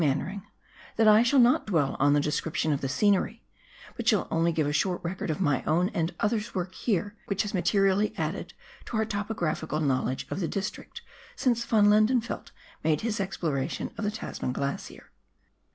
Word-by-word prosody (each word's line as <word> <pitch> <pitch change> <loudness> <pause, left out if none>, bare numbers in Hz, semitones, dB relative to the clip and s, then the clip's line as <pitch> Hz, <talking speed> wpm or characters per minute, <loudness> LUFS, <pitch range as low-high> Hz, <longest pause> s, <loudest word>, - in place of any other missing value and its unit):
Mannering,* 155 +8 -1 0.5
that 225 0 +3
I 215 +1 +7
shall 245 +4 +3
not 245 -2 +4
dwell 155 -9 +1
on 145 +1 +4
the 145 - +4
description 150 +1 0
of 140 - -2
the 135 - -2
scenery, 205 - +1 0.5
but 235 -2 -5
shall 215 -5 +3
only 165 +1 +2
give 160 -2 0
a 145 - -1
short 180 +4 +1
record 180 +1 -4
of 155 - -1
my 145 -8 +1
own 175 +4 +2
and 165 -4 -1
others' 210 0 -1
work 185 0 -3
here, 205 -1 -1
which 200 +1 0
has 210 - -5
materially 195 +2 +2
added - - -3 0.3
to 235 - -3
our 220 - +2
topographical 200 -8 -2
knowledge 130 -3 0
of - - -2
the 175 - -1
district 195 +3 -5 0.3
since 235 -3 0
Yon 215 -2 +5
Lendenfeldt 215 +3 +2 0.3
made 155 -2 +2
his 220 -2 -2
exploration 165 -8 -2
of - - -5
the 205 - +1
Tasman 210 -11 -4
Glacier. 140 +1 -5
190 Hz, 180 wpm, -27 LUFS, 155-215 Hz, 0.5 s, I